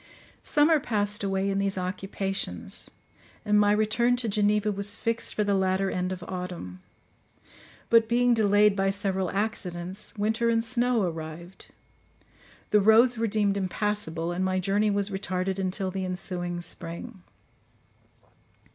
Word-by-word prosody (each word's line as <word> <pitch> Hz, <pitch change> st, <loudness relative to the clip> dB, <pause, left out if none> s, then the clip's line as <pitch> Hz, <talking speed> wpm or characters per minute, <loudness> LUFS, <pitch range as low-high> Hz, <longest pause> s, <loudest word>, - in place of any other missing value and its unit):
Summer 300 Hz, +1 st, +3 dB
passed 210 Hz, -5 st, -1 dB
away 195 Hz, 0 st, 0 dB
in 195 Hz, 0 st, 0 dB
these 195 Hz, -1 st, -1 dB
occupations, 185 Hz, -, -3 dB, 0.6 s
and 210 Hz, 0 st, +4 dB
my 205 Hz, 0 st, +4 dB
return 215 Hz, +3 st, +2 dB
to 245 Hz, -1 st, -2 dB
Geneva 210 Hz, 0 st, +2 dB
was 200 Hz, 0 st, 0 dB
fixed 230 Hz, 0 st, -2 dB
for 210 Hz, -, +1 dB
the 205 Hz, -1 st, +1 dB
latter 190 Hz, 0 st, +1 dB
end 180 Hz, 0 st, -2 dB
of 185 Hz, -1 st, -5 dB
autumn; 180 Hz, -, -6 dB, 1.1 s
but 230 Hz, -1 st, +5 dB
being 245 Hz, +1 st, +3 dB
delayed 210 Hz, -2 st, +4 dB
by 195 Hz, 0 st, +1 dB
several 195 Hz, -2 st, -1 dB
accidents, 190 Hz, -2 st, -4 dB
winter 220 Hz, +3 st, +1 dB
and 230 Hz, 0 st, +1 dB
snow 245 Hz, -2 st, +1 dB
arrived, 165 Hz, +1 st, -6 dB, 1.0 s
the 210 Hz, -, +5 dB
roads 225 Hz, +4 st, +5 dB
were 230 Hz, -, +1 dB
deemed 205 Hz, -2 st, +1 dB
impassable, 185 Hz, -4 st, -1 dB
and 180 Hz, +2 st, -2 dB
my 185 Hz, 0 st, 0 dB
journey 200 Hz, +3 st, +1 dB
was 200 Hz, 0 st, -1 dB
retarded 190 Hz, 0 st, -2 dB
until 190 Hz, 0 st, -2 dB
the 190 Hz, 0 st, -3 dB
ensuing 180 Hz, -1 st, -4 dB
spring. 175 Hz, +5 st, -7 dB
200 Hz, 140 wpm, -27 LUFS, 185-215 Hz, 1.1 s, but